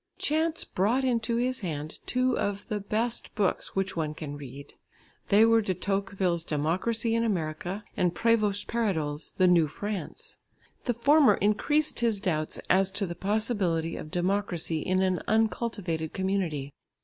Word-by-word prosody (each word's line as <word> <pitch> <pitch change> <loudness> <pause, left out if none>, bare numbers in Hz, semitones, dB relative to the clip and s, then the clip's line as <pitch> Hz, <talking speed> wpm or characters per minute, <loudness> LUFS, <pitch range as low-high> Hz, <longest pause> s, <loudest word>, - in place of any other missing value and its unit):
Chance 320 +2 0
brought 225 +8 0
into 235 -2 0
his 250 +2 +1
hand 155 -5 -5
two 255 0 +1
of 200 0 -2
"the 210 - -1
best 220 +4 -1
books 200 -4 -1
which 190 -1 -1
one 155 -2 -2
can 145 -2 -6
read." 140 0 -10 0.6
They 210 +3 +6
were 230 0 +5
De 190 -3 -2
Tocqueville's 195 -2 -1
Democracy 185 +10 0
in 230 0 +2
America 180 0 -2
and 180 -1 +1
Prévost 215 -3 +2
Paradol's 160 -10 -1
The 185 - +4
New 175 -3 +5
France. 195 +2 -6 0.5
The 245 - 0
former 285 +4 +5
increased 295 +9 +1
his 230 -4 +1
doubts 155 -5 -1
as 190 +1 +4
to 200 0 0
the 170 - -4
possibility 195 -5 0
of 155 - -7
democracy 175 -2 0
in 185 +4 +1
an 185 -1 +1
uncultivated 215 -7 0
community. 185 -8 -2
195 Hz, 150 wpm, -28 LUFS, 170-225 Hz, 0.6 s, They